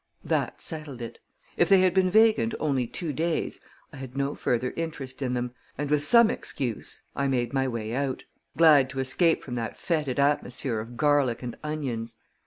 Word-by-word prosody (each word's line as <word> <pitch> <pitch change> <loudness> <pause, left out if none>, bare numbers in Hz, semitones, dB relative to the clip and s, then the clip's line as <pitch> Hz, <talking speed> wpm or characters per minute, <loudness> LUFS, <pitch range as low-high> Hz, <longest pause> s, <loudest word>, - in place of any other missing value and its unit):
That - - -1
settled 150 -5 -6
it. 115 -1 -7 0.4
If 175 - +3
they 195 -1 +7
had 185 -1 +3
been 185 -1 +3
vacant 220 +2 +4
only 135 -5 0
two 160 +4 -4
days, 165 +3 -1 0.3
I - - -9
had 130 0 -8
no 140 +1 0
further 125 +1 -1
interest 145 -5 -5
in 125 -2 -1
them, 125 0 -3 0.2
and 145 +1 -3
with 150 -1 +2
some 235 +8 +6
excuse 120 -6 -4
I 140 - 0
made 125 -1 0
my 135 -1 +1
way 115 -3 -3
out, 135 0 -2 0.3
glad 150 -5 +6
to 135 - -5
escape 160 +6 +2
from 125 - -7
that 115 -2 -4
fetid 150 -7 -1
atmosphere 135 -4 0
of 115 +2 -8
garlic 145 -5 +2
and 120 -1 -5
onions. 125 -7 -3
140 Hz, 185 wpm, -27 LUFS, 125-155 Hz, 0.4 s, they